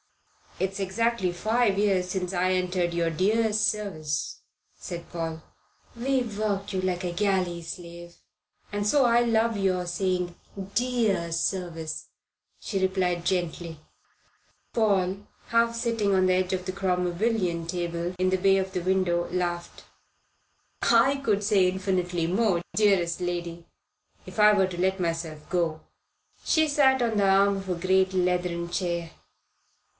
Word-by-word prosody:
"It's 190 +1 -2
exactly 200 0 0
five 215 +3 +1
years 195 -3 +1
since 185 0 -3
I 185 +1 +1
entered 180 -1 0
your 170 -1 +1
dear 210 +6 +1
service," 200 -8 -1 0.3
said 170 -1 -8
Paul. 165 -1 -4 0.5
"We've 245 -3 -1
worked 200 -2 -2
you 190 - 0
like 185 -1 -1
a 175 - -2
galley 185 -2 0
slave, 170 0 -9 0.6
and 205 0 -2
so 270 +5 +4
I 235 0 +4
love 230 -1 +2
your 185 -2 0
saying 180 -1 -1 0.4
'dear 225 -9 +1
service,'" 165 -2 -3 0.5
she 195 - -3
replied 185 -2 0
gently. 170 -3 -2 0.9
Paul, 200 -2 +1 0.2
half 230 0 +2
sitting 230 -4 0
on 185 0 +3
the 185 - +3
edge 185 0 0
of 185 -1 -2
the 185 - -2
Cromwellian 180 -1 0
table 170 0 -3
in 185 0 +2
the 185 - +2
bay 195 +1 +4
of 190 0 -2
the 180 - -1
window, 180 -1 +1
laughed. 175 -1 -3 1.0
"I 235 +4 +4
could 210 -4 +1
say 200 -3 +4
infinitely 180 -2 -1
more, 190 -1 +1
dearest 190 -5 +2
lady, 175 -1 -4 0.6
if - - -8
I 210 0 +7
were 195 -2 +3
to 175 -1 -5
let 190 +1 +1
myself 165 -3 -3
go." 170 -3 0 0.6
She 315 -1 +3
sat 270 -3 +3
on 230 -3 +1
the 200 -1 +3
arm 195 +1 +4
of 195 -1 -7
a 180 - 0
great 190 +2 +2
leathern 180 -1 0
chair. 170 -2 -2
185 Hz, 140 wpm, -26 LUFS, 175-205 Hz, 1.0 s, I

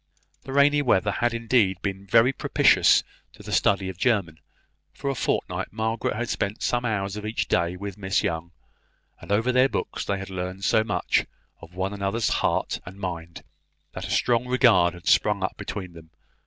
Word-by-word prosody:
The 135 - -7
rainy 145 +1 +4
weather 105 -6 +2
had 120 +3 0
indeed 115 -5 +1
been 100 0 -4
very 115 +6 +4
propitious - - +4 0.3
to - - -14
the - - -8
study 100 -1 +2
of 95 -1 -7
German. 95 -11 0 0.6
For 140 - -2
a - - -2
fortnight 130 - -2
Margaret 110 0 -2
had 120 +2 -3
spent 100 -1 -3
some 120 0 0
hours 100 -3 -2
of 105 - -6
each 110 +1 -2
day 85 +1 0
with 100 +1 -7
Miss 95 0 0
Young; 80 +1 -2 0.7
and - - -9
over 110 +5 +2
their 130 +1 +4
books - - -3
they 100 - -2
had 95 0 -7
learned 90 +1 -5
so 110 - +3
much 105 -2 0 0.3
of 85 +2 -14
one 95 +2 -2
another's 100 +3 -1
heart - - 0
and 95 +2 -11
mind, 85 -3 -6 0.5
that - - -6
a - - -10
strong 120 0 +1
regard 115 -9 +4
had 90 +1 -12
sprung 105 -2 +3
up 95 - -2
between 95 -4 -6
them. 80 -1 -14
100 Hz, 185 wpm, -25 LUFS, 95-115 Hz, 0.7 s, rainy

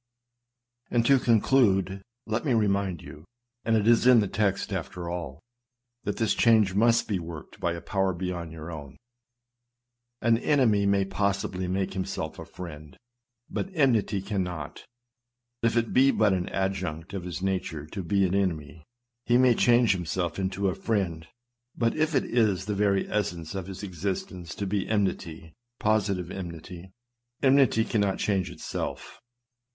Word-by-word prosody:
And 120 -1 +2
to 135 +1 +5
conclude, 105 -5 +3 0.2
let 110 +2 -1
me 135 -6 +2
remind 100 -5 0
you 75 - -11 0.2
— 120 0 -57
and 115 -1 +2
it 105 0 +1
is 120 +1 +5
in 125 -2 +8
the 105 - +1
text 100 0 -1
after 90 -1 -4
all 85 -6 -5 0.3
— 120 0 -57
that 105 - -2
this 110 -2 +2
change 110 -5 +4
must 115 +3 +3
be 100 -4 -1
worked 85 -3 -9
by 85 - 0
a 85 - -6
power 95 -1 0
beyond 90 -2 -4
your 80 +1 -8
own. 75 -3 -9 1.2
An 115 -1 +3
enemy 115 -9 +3
may 100 -1 +3
possibly 95 -1 -1
make 95 +1 -1
himself 95 -1 -4
a - - -7
friend; 75 -5 -10 0.5
but - - -3
enmity 115 - +2
cannot. 90 -6 -4 0.8
If 115 0 +2
it 115 -1 0
be 135 +2 +6
but 110 -6 +3
an 90 -1 -1
adjunct 95 -3 -3
of 95 -3 -4
his 90 +1 -5
nature 90 -6 -2
to 95 +6 -6
be 100 +2 +2
an 90 - -1
enemy, 85 -5 -1 0.4
he 120 0 +5
may 125 -1 +5
change 120 0 +4
himself 90 -1 -2
into 95 +1 -1
a 95 - +1
friend; 90 -8 -2 0.5
but 115 -1 +1
if 155 0 +1
it - - +2
is 105 -6 +1
the 105 - -2
very 100 -1 +1
essence 90 -5 -2
of 95 -2 -5
his 95 +1 -8
existence 90 -2 -4
to 100 - -3
be 100 0 -2
enmity, 85 -6 -2 0.3
positive 100 -4 0
enmity, 90 0 -8 0.5
enmity 130 -5 +4
cannot 100 -3 0
change 95 -3 0
itself. - - -6
95 Hz, 160 wpm, -27 LUFS, 90-110 Hz, 1.2 s, in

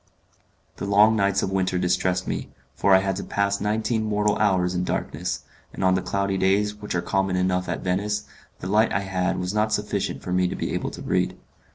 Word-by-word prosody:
The 100 - -4
long 105 +2 +5
nights 100 -2 +2
of 95 - -1
winter 95 -1 0
distressed 90 +1 0
me, - - -3 0.2
for 95 +6 +4
I 95 - +5
had 95 -1 -1
to - - -4
pass 100 0 0
nineteen 110 +2 0
mortal 105 -1 +1
hours 95 -4 +2
in 90 0 -1
darkness; 90 0 -3 0.3
and - - -4
on 95 0 +4
the 95 - +1
cloudy 100 +1 -1
days, 100 +2 +2
which 105 -2 -6
are 90 - 0
common 95 -1 0
enough 90 0 0
at - - -2
Venice, 105 +3 -1 0.4
the - - -4
light 105 +3 +3
I 95 - +1
had 95 -1 -1
was 90 +1 -2
not 105 +1 +1
sufficient 105 -2 -2
for 90 - -3
me 90 0 +3
to - - -4
be - - -3
able - - -2
to - - -9
read. - - 0
95 Hz, 215 wpm, -24 LUFS, 90-105 Hz, 0.4 s, long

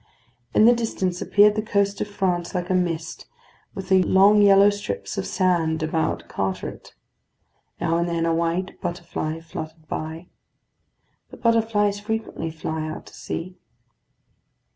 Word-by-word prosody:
In 215 - +6
the 240 - +8
distance 190 -6 -2
appeared 205 +1 +5
the 215 - -1
coast 200 -2 0
of - - -1
France 185 -4 -2
like 180 0 -2
a - - +3
mist, 165 -3 -2 0.5
with 190 -1 -7
the 190 -1 +5
long 200 +3 +5
yellow 200 0 +7
strips 205 - -5
of - - -3
sand 165 -4 +1
about 160 0 -1
Carteret. 95 -1 -4 0.8
Now 165 +1 +1
and 170 +1 0
then 165 -1 0
a 165 - +2
white 170 +3 -2
butterfly 165 -2 -4
fluttered 160 -1 -8
by. 160 +3 -5 1.0
The - - -12
butterflies 220 -3 +2
frequently 220 -5 -3
fly 160 0 -4
out - - -7
to - - -15
sea. 180 +2 -6
180 Hz, 140 wpm, -23 LUFS, 165-205 Hz, 1.0 s, the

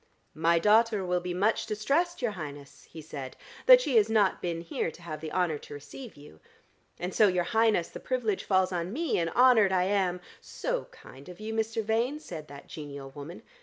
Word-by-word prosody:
"My 165 +2 +2
daughter 210 +2 +3
will 180 0 +1
be 180 0 -5
much 205 +5 +1
distressed, 280 +10 0
your 235 - +1
Highness," 145 -6 -9
he 160 -1 -10
said, 140 -4 -8 0.3
"that - - +9
she 270 - +1
has 215 0 +4
not 210 -4 +2
been 170 -2 -3
here 165 0 -2
to 165 - -14
have 155 -3 -6
the 160 -1 -6
honour 170 -4 0
to 145 - -10
receive 145 - -10
you. 145 - -15 0.6
And 180 +2 -4
so, 215 - +5
your 180 -2 +1
Highness, 220 -3 +2
the - - -9
privilege 235 -6 -1
falls 185 -1 +2
on 175 0 -3
me, 320 - 0
and 165 -1 0
honoured 235 -2 +5
I 185 -1 +2
am 185 -2 0 0.2
" - - -35 0.2
"So - - -1
kind 140 - -15
of 180 - -11
you, 220 +1 -5
Mr. 220 0 -1
Vane," 230 +7 0
said 160 - -8
that 140 -1 -11
genial 140 -3 -8
woman. 145 +5 -9
185 Hz, 205 wpm, -28 LUFS, 165-225 Hz, 0.6 s, that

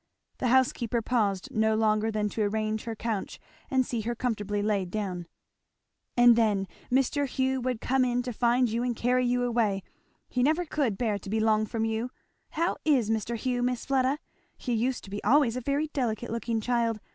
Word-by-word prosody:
The 255 - 0
housekeeper 240 -2 +2
paused 215 -1 0
no 220 -2 +2
longer 215 0 +2
than 215 -1 0
to 220 - -3
arrange 215 +1 -1
her 230 -1 -4
couch 220 -2 -3 0.3
and 260 -1 +2
see 235 -2 -2
her 235 +2 -2
comfortably 210 -4 -2
laid 200 -4 0
down. 185 -4 -3 0.9
"And 240 -1 +7
then 210 -4 +2 0.2
Mr. 270 +2 +2
Hugh 260 0 0
would 250 -2 -2
come 265 0 +2
in 245 0 +1
to 250 -1 -4
find 245 +2 +3
you 230 +1 -1
and 245 -1 -1
carry 250 +2 +2
you 245 0 +1
away 225 -5 +1 0.4
he 250 - -1
never 315 +7 +2
could 275 - -1
bear 215 -4 0
to 195 - -9
be 220 +2 0
long 215 0 +2
from 225 +1 -1
you. 225 +2 -1 0.4
How 335 +3 -1
is 260 -8 +3
Mr. 225 +1 -1
Hugh, 245 +2 -1
Miss 245 -1 -1
Fleda? 270 0 +2 0.4
he 245 - -3
used 240 +3 0
to 195 - -11
be 205 - -5
always 250 0 +4
a 255 - -3
very 280 +4 0
delicate 240 -6 -2
looking 230 -1 -1
child. 230 -1 0
235 Hz, 190 wpm, -28 LUFS, 215-255 Hz, 0.9 s, And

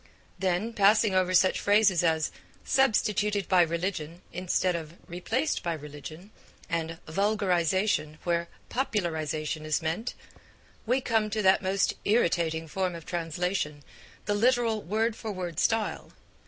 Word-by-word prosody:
Then, 190 +4 0
passing 210 0 +4
over 185 -1 +2
such 185 +1 +4
phrases 205 -4 +4
as 160 -2 +1 0.3
'substituted 210 -5 +2
by 185 -2 +5
religion' 170 0 -2
instead 180 0 0
of 165 -1 -6
'replaced 225 - -1
by 170 - -1
religion,' 155 +5 -9 0.4
and 165 -1 -2
'vulgarisation' 185 -3 +1
where 170 -1 0 0.2
'popularisation' 160 - -2
is 155 -1 0
meant, 165 +9 -3 0.7
we 255 +3 +2
come 225 -3 +1
to 215 0 -1
that 190 0 +5
most 195 +1 +1
irritating 170 -6 +1
form 185 +2 -2
of 165 -2 -9
translation, 170 -2 -2 0.4
the 205 - 0
literal 230 0 +2
word 220 +4 0
for 220 -1 -5
word 180 -4 -4
style. 225 -2 0
185 Hz, 125 wpm, -28 LUFS, 165-210 Hz, 0.7 s, by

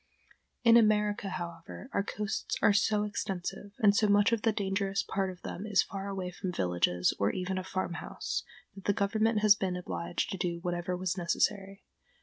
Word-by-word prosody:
In 230 0 +7
America, 210 -2 +2
however, 170 +4 -7
our - - +2
coasts 210 +1 -3
are 205 - +5
so 210 +1 +2
extensive, 200 -1 -4
and 205 -4 +4
so 215 - +3
much 205 +2 +4
of 230 -2 +1
the 225 - +3
dangerous 195 -1 -1
part 195 -1 -1
of 180 -1 -10
them 200 +4 -5
is 205 -2 +4
far 195 0 -6
away 190 -2 -4
from 180 +1 -4
villages, 90 - +1
or 100 - +3
even 185 +1 -2
a - - -5
farmhouse, 185 -2 -3 0.3
that 195 - -12
the 205 - +3
government 215 +2 +1
has 210 -1 +8
been 190 -3 -2
obliged 85 - -3
to 190 - -4
do 175 -1 -1
whatever 175 0 -2
was 185 +1 -2
necessary. 195 +3 0
195 Hz, 180 wpm, -30 LUFS, 180-210 Hz, 0.3 s, has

